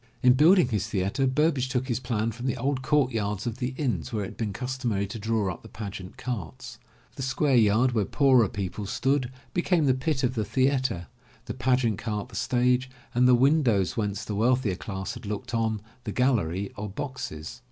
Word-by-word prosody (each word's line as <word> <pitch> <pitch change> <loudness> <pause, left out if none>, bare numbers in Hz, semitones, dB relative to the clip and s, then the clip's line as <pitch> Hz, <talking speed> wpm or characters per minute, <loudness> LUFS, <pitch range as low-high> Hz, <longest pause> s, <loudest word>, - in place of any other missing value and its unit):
In 125 0 +7
building 160 +2 +5
his 105 -3 -1
theatre, 100 +6 0
Burbage 135 -1 +1
took 130 -1 -1
his 120 -2 -1
plan 115 -3 -1
from 120 +4 -5
the 130 - -1
old 135 -1 -1
courtyards 115 -8 0
of 120 +1 -4
the 130 0 -2
inns 100 - -1
where 105 -2 -1
it 95 - -5
had - - -13
been 110 -3 -2
cus 125 +5 -4
tomary 110 -7 -1
to 105 +3 -7
draw 105 -3 0
up - - -13
the - - -13
pageant 100 -4 -7
carts. 105 -11 -6 0.4
The - - -5
square 135 +1 +1
yard 115 +2 +4
where 110 -4 +1
poorer 130 -6 +4
people 100 +1 -4
stood, 130 +3 0 0.2
became 175 -2 +2
the 130 - +4
pit 135 +1 -1
of 125 - +1
the 110 -4 -1
theatre, 130 -5 +1 0.4
the - - -4
pageant 125 -3 +1
cart 105 -2 -3
the - - -12
stage, 125 +1 +1 0.2
and 125 +1 +4
the 125 - +7
windows 125 - +3
whence 105 -2 -2
the 105 - -4
wealthier 115 -1 +2
class 95 0 -5
had 120 -3 -9
looked 115 +4 -5
on, 110 -2 0 0.2
the 105 - -3
gallery 100 -7 +1
or 105 0 -5
boxes. 120 - -6
120 Hz, 200 wpm, -27 LUFS, 105-130 Hz, 0.4 s, In